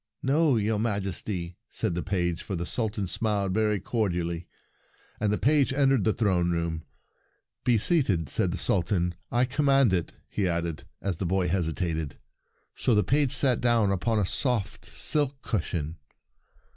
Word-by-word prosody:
" - - -45
No, 155 -3 +4
your 105 0 0
Majesty," 95 -4 -2
said 110 -6 -1
the 90 - -2
page, 85 -3 -1
for 95 - -4
the 85 0 -3
Sultan 105 -1 -1
smiled 100 -1 -1
very 105 0 +1
cordially; 90 -5 -2 0.7
and 105 -1 +1
the 105 - +1
page 145 0 +3
entered 135 -4 +2
the 110 - +4
throne 95 -6 +1
room. 85 -2 -1 0.4
" - - -46
Be 120 -2 +4
seated," 110 - +2
said - - +1
the - - -3
Sultan; 90 0 0
" - - -46
I 120 +1 +3
command 135 -4 +3
it! 85 -3 -1
" - - -42
he 100 - -1
added, 85 -2 -2 0.2
as 95 -4 -2
the 95 - -2
boy 95 0 +1
hesitated. 80 -4 -2 0.6
So 120 - +1
the 105 - +4
page 140 -1 +2
sat 130 -3 +2
down 115 -4 +3
upon 100 +4 0
a 105 - +2
soft 105 0 0
silk 145 -3 +1
cushion. 80 -6 -2
100 Hz, 170 wpm, -27 LUFS, 85-120 Hz, 0.7 s, No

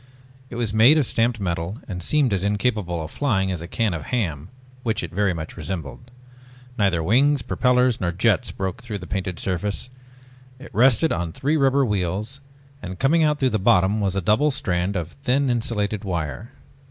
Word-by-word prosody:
It - - -8
was 115 -3 -2
made 120 +8 +6
of 150 - +2
stamped 115 0 0
metal 85 +1 -3
and 90 -2 -5
seemed 135 - +2
as 95 - 0
incapable 100 -5 -1
of 80 - -8
flying 95 -9 0
as 90 -3 -4
a 85 - -7
can 110 0 0
of 80 -3 -5
ham 85 - -2 0.3
which 110 -5 -1
it 85 - -5
very 100 0 +1
much 80 -2 -6
resembled. 80 - -6 0.7
Neither 95 -8 +1
wings, 135 - +3
propellors, 125 -1 +2
nor 85 -1 0
jets 110 +6 +1
broke 95 -2 -4
through 115 -4 -5
the 90 - -9
painted 90 -3 -3
surface. 100 +6 -3 0.7
It 130 - -13
rested 125 +7 +4
on 85 -1 -2
three 145 +4 0
rubber 140 -2 +3
wheels 105 +5 -2 0.4
and 95 -3 -7
coming 160 - +3
out 150 -1 +2
through 130 -2 +2
the 110 - 0
bottom 100 0 +3
was 95 -2 0
a 100 - 0
double 110 - +3
strand 95 -7 -1
of 85 -2 -3
thin 135 0 +1
insulated 110 -3 -1
wire. 90 +3 -4
105 Hz, 185 wpm, -23 LUFS, 90-125 Hz, 0.7 s, made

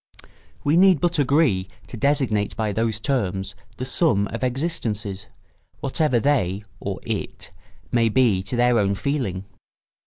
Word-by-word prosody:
We 150 +3 +3
need 185 -3 +6
but 175 -1 +1
agree 140 - +2 0.2
to - - -9
designate 120 -5 +1
by 110 -2 0
those 110 0 -1
terms 100 -6 -1 0.2
the 130 - -4
sum 125 - +3
of 115 +2 -5
existences, 115 - -3 0.5
whatever 140 -2 +1
they 105 -8 +1 0.2
(or - - -4
it) - - -5 0.4
may 115 -1 +3
be 110 -5 +3
to 100 +6 -5
their 120 -1 +3
own 100 -1 +1
feeling. 105 -5 -2
120 Hz, 135 wpm, -23 LUFS, 100-140 Hz, 0.5 s, need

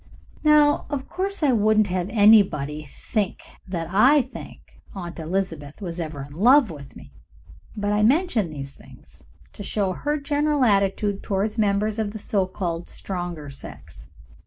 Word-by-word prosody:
Now, 300 -1 +4
of 280 -2 -4
course, 390 -1 -3
I 285 - +4
wouldn't 215 -2 +3
have 180 +1 -2
anybody 195 -9 +4
think 205 +4 -3 0.2
that 170 -3 -3
I 255 +8 +5
think 255 - -12
Aunt 175 -3 -7
Elizabeth 165 -4 -3
was 175 -3 -5
ever 155 -4 -5
in 145 - -14
love 240 - +5
with 140 -3 -11
me, - - -14 0.6
but 205 0 -1
I 210 - +2
mention 240 - +2
these 140 -2 -8
things - - -16 0.3
to - - -10
show 195 -1 -1
her 295 +10 -2
general 290 0 +1
attitude 200 -2 +1
toward 205 +2 -1
members 210 +1 +1
of 210 -2 -2
the - - -5
so 200 -2 -1
called 175 -3 -4
stronger 175 -6 -5
sex. 140 - -11
205 Hz, 155 wpm, -23 LUFS, 175-235 Hz, 0.6 s, I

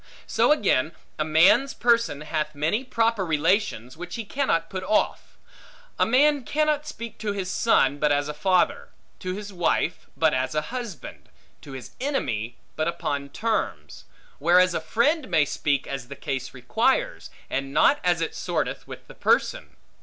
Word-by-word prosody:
So - - +2
again, 165 - +2 0.3
a - - +2
man's 185 - +4
person 230 -12 +2
hath 150 -1 -3
many 160 - 0
proper 230 -5 +1
relations, 160 - 0
which 175 +2 -7
he 230 - -5
cannot 200 -9 0
put 185 +1 -5
off. 210 +3 0 0.6
A - - +4
man 285 +3 +4
cannot 305 +2 0
speak 235 -5 -8
to 210 -2 -2
his 190 -2 -3
son 145 - +2
but 150 0 +2
as 145 0 +1
a 150 - -4
father; 185 +4 +1 0.3
to 185 0 -4
his 205 0 -7
wife 175 -1 0
but 160 -1 +3
as 130 +3 -1
a 150 - -1
husband; 235 - -7 0.3
to 140 - -10
his 130 -2 -8
enemy 120 - -2 0.2
but 155 0 -1
upon 145 -4 -3
terms: 140 - -3 0.3
whereas 180 +3 +4
a - - -1
friend 260 - +1
may 160 -4 +3
speak 140 -1 -1
as 135 -3 -5
the 140 - -8
case 135 -3 -4
requires, 235 - 0 0.2
and 135 0 -3
not 290 - +4
as 175 -2 +2
it 165 - -2
sorteth - - -3
with - - -10
the - - -13
person. - - 0
175 Hz, 165 wpm, -25 LUFS, 145-230 Hz, 0.6 s, man's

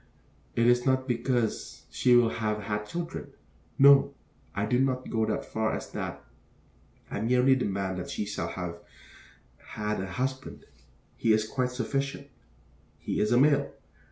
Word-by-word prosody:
It 115 - +3
is 120 0 +4
not 130 0 +1
because 120 -2 -1
she 125 -1 +4
will 120 -2 +5
have 105 -2 -1
had 105 0 -3
children. 170 +4 -5 0.4
No. 140 0 +6 0.4
I 100 - 0
do 125 +2 +1
not 130 -1 0
go 110 -1 0
so 110 - 0
far 110 0 -1
as - - -7
that. - - -5 0.9
I - - -3
merely 125 +3 +4
demand 95 -6 -2
that 90 - -6
she 105 - -3
shall 105 - -3
have 90 -2 -5 0.8
had 105 -2 -4
a 95 - -4
husband. 130 +8 -4 0.5
He 115 - +3
is 110 0 +1
quite 130 0 -1
sufficient. 135 +3 -3 0.7
He - - -3
is 105 - +1
a 120 - +5
male. 145 +1 +3
120 Hz, 155 wpm, -28 LUFS, 105-130 Hz, 0.9 s, No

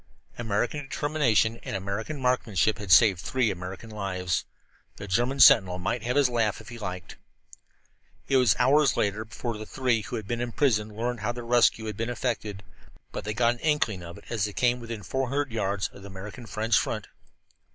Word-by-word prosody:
American 120 +5 -1
determination 135 -6 +1
and - - -5
American 100 +9 -4
marksmanship 110 -6 +1
had 100 -3 -5
saved 100 -3 +7
three 125 0 +1
American 95 +4 -7
lives. 90 -4 -2 0.5
The 100 - -8
German 120 +8 0
sentinel 90 -7 +7
might 95 +6 -2
have 120 +3 -2
his 145 -2 +5
laugh 115 -4 0
if - - -12
he 120 0 -9
liked. 90 -5 -6 1.1
It 135 - +3
was 125 -6 +4
hours 135 +2 +4
later 105 +1 0
before 115 0 -5
the 110 - -6
three 125 -4 0
who 115 +3 -6
had 110 -4 -5
been 120 +1 -2
imprisoned 110 -4 0
learned 120 +1 -2
how 110 +3 -2
their 120 -1 -7
rescue 120 -2 +3
had 105 -2 -5
been 115 +1 -2
effected; 110 -5 -3 0.5
but - - -6
they 105 0 -3
got 120 +1 +3
an 120 - -12
inkling 150 - 0
of 85 0 -9
it - - -15
as 110 -4 -1
they 105 - -5
came 125 +2 +2
within 115 -3 -7
four 130 +7 -2
hundred 140 0 -1
yards 100 -3 -1
of - - -14
the 100 - -10
American 100 +5 -9
French 110 +2 +2
front. - - -3
115 Hz, 195 wpm, -27 LUFS, 100-125 Hz, 1.1 s, saved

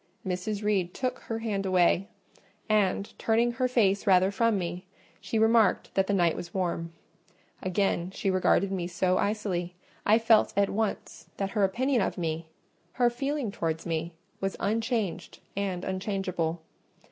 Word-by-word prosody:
Mrs. 190 +3 -3
Reed 190 -4 0
took 255 -1 -2
her 225 - -4
hand 215 -3 -2
away, 185 0 +3 0.6
and, 205 -2 +1
turning 230 +2 +2
her 255 +1 0
face 210 -5 +2
rather 190 0 +5
from 225 +1 +2
me, 175 0 -4 0.4
she 225 - -3
remarked 220 -2 +3
that 195 0 +2
the 205 - +1
night 170 -3 +3
was 175 +1 -8
warm. 170 -3 -1 0.7
Again 185 -1 0
she 195 0 -1
regarded 190 +1 +2
me 180 -3 -2
so 180 +1 +1
icily, 190 -4 -1 0.3
I 215 +2 +5
felt 225 -1 +4
at 200 -1 +3
once 215 0 -3
that 195 -1 -2
her 210 -2 +1
opinion 245 +6 +2
of - - -1
me—her 165 +8 -3
feeling 275 -1 -2
towards 160 -4 -3
me—was 170 +3 -4
unchanged 225 -2 -1 0.2
and 190 -2 -2
unchangeable. 185 -4 -2
195 Hz, 145 wpm, -28 LUFS, 180-220 Hz, 0.7 s, rather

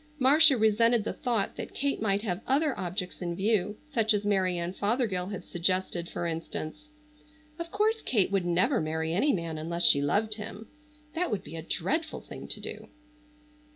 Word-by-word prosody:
Marcia 280 +1 +6
resented 220 +1 +3
the - - -3
thought 230 -5 -1
that - - -7
Kate 280 -4 0
might 200 -1 +1
have 185 -3 -2
other 280 +1 +2
objects 180 +1 -4
in 175 -1 -2
view, 205 +1 +1
such 225 -5 +3
as 205 0 -2
Mary 190 -3 +1
Ann 170 +1 -3
Fothergill 205 -3 0
had 200 -2 -6
suggested 175 -1 -1
for 175 - -4
instance. 165 - -5 0.7
Of 335 0 -5
course 430 +4 +1
Kate 205 -7 +1
would 195 -2 +1
never 175 0 +2
marry 160 +1 -2
any 275 - +3
man 165 - -3
unless 170 +2 -1
she 140 - +7
loved 205 +10 +1
him. 215 +1 -8 0.5
That 350 +2 -1
would 205 -5 -2
be 165 - -9
a 165 - -4
dreadful 270 - -2
thing - - -10
to - - -2
do. - - -7
200 Hz, 180 wpm, -29 LUFS, 175-235 Hz, 0.7 s, she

